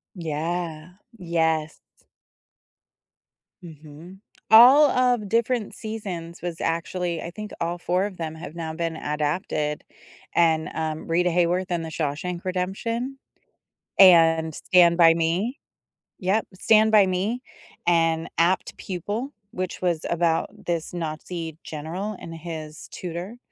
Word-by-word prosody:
Yeah, 165 0 -4 0.2
yes. 160 -3 0 1.8
Mhm. 160 +3 -12 0.3
All 260 +6 +9
of 245 -5 +1
different 230 0 0
seasons 185 -7 -6
was 170 -1 -5
actually, 170 +1 -2
I 170 - -6
think 215 +2 -8
all 170 +1 -1
4 180 +2 0
of 200 -3 -7
them 160 -1 -4
have 160 0 -9
now 160 -2 -4
been 165 0 -3
adapted, 150 0 -2 0.5
and, 160 -2 +3
um, 160 -1 -3
Rita 175 +2 +2
Hayworth 180 +2 +1
in 170 -1 0
The 160 - -5
Shawshank 160 +3 -3
Redemption, 230 +8 -3 0.8
and 165 -4 +6
Stand 170 +1 +4
By 165 -2 +7
Me. 170 +10 -1 0.6
Yep, 195 +4 0
Stand 220 +3 +4
By 210 -2 +7
Me, 195 +7 -1 0.4
and 165 -1 +2
Apt 175 +3 +1
Pupil, 205 - -4 0.2
which 185 -3 -4
was 175 -3 0
about 165 -1 +1 0.2
this 170 -1 -2
Nazi 165 -1 -5
general 170 +8 -5
and 165 - -9
his 160 -2 -8
tutor, 180 +6 -6
170 Hz, 120 wpm, -24 LUFS, 160-190 Hz, 1.8 s, All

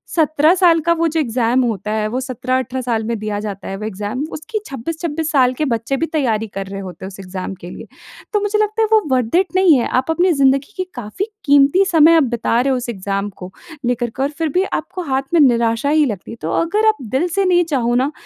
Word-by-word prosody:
17 310 0 +3
साल 345 -3 +4
का 335 +2 +2
वो 335 0 +1
जो 320 +1 -1
एग्जाम 245 -2 +1
होता 210 -3 -2
है। 215 0 0
वो 245 +4 -2
17-18 255 0 -2
साल 235 -3 -1
में 230 +1 -2
दिया 210 -1 -3
जाता 205 -2 -6
है 195 - -4
वो 210 - -6
17-18 - - -2
एग्जाम 210 +6 -4
उसकी 310 +8 -4
26-26 315 +4 -4
साल 255 -3 +3
के 305 +4 -2
बच्चे 240 +1 -1
भी 330 - 0
तैयारी 225 -8 0
कर 195 -1 -6
रहे 195 0 -6
होते 185 -1 -8
हैं - - -5
उस 195 0 -11
एग्जाम 185 0 -6
के 175 - -8
लिए। - - -10 0.5
तो 420 - +3
मुझे 415 +1 0
लगता 430 +1 0
है 440 - +3
वो 440 -1 +5
वर्थ 250 +2 0
इट 375 +1 +3
नहीं 370 -4 +5
है। 235 - -1
आप 295 +5 -2
अपनी 355 +3 +2
जिंदगी 275 +4 +2
की 370 - 0
काफ़ी 245 - -4 0.2
कीमती 285 +7 +5
समय 325 0 +6
आप 315 - +4
बिता 235 -1 0
रहे 270 +1 +1
हो 260 - +1
उस 245 -1 -5
एग्जाम 200 -1 -3
को 180 +1 -7 0.3
लेकर 240 -1 0
के। 265 +4 -4
और 280 - +1
फ़िर 325 -2 -1
भी 370 - +4
आपको 365 - -3
हाथ 265 +1 +1
में 335 - +5
निराशा 235 -1 +2
ही 305 0 +4
लगती 210 -7 -5
है। 230 - -8
तो 160 - -3
अगर 420 +6 +1
आप 435 - +3 0.2
दिल 320 +7 +2
से 395 -1 +2
नहीं 355 -1 +4
चाहो 240 -2 +1
ना 265 +4 +1
260 Hz, 250 wpm, -18 LUFS, 225-325 Hz, 0.5 s, समय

